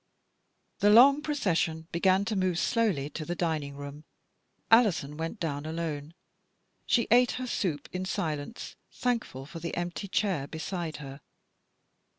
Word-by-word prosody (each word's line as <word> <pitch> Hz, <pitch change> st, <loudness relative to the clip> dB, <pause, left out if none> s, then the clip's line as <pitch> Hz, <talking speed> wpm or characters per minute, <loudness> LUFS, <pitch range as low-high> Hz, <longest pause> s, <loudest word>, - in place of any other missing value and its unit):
The 205 Hz, -, +4 dB
long 270 Hz, +7 st, +8 dB
procession 170 Hz, -, 0 dB
began 190 Hz, +3 st, +3 dB
to 215 Hz, -, -1 dB
move 185 Hz, -3 st, +1 dB
slowly 195 Hz, -, +1 dB
to 155 Hz, -, -5 dB
the 175 Hz, +3 st, -3 dB
dining 155 Hz, -5 st, -2 dB
room. 145 Hz, +1 st, -8 dB, 0.7 s
Alison 195 Hz, -, +4 dB
went 165 Hz, +7 st, -4 dB
down 145 Hz, -3 st, -2 dB
alone. 160 Hz, -1 st, -4 dB, 0.7 s
She 235 Hz, -, +3 dB
took 245 Hz, +2 st, +5 dB
her 255 Hz, -, -4 dB
soup 180 Hz, -, -2 dB
in 185 Hz, 0 st, -2 dB
silence, 155 Hz, +2 st, -4 dB, 0.2 s
thankful 230 Hz, -, -2 dB
for 165 Hz, +4 st, -8 dB
the 170 Hz, +1 st, -4 dB
empty 175 Hz, +3 st, -3 dB
chair 190 Hz, -8 st, 0 dB
beside 165 Hz, +1 st, -4 dB
her. 140 Hz, -1 st, -9 dB
170 Hz, 140 wpm, -29 LUFS, 150-210 Hz, 0.7 s, long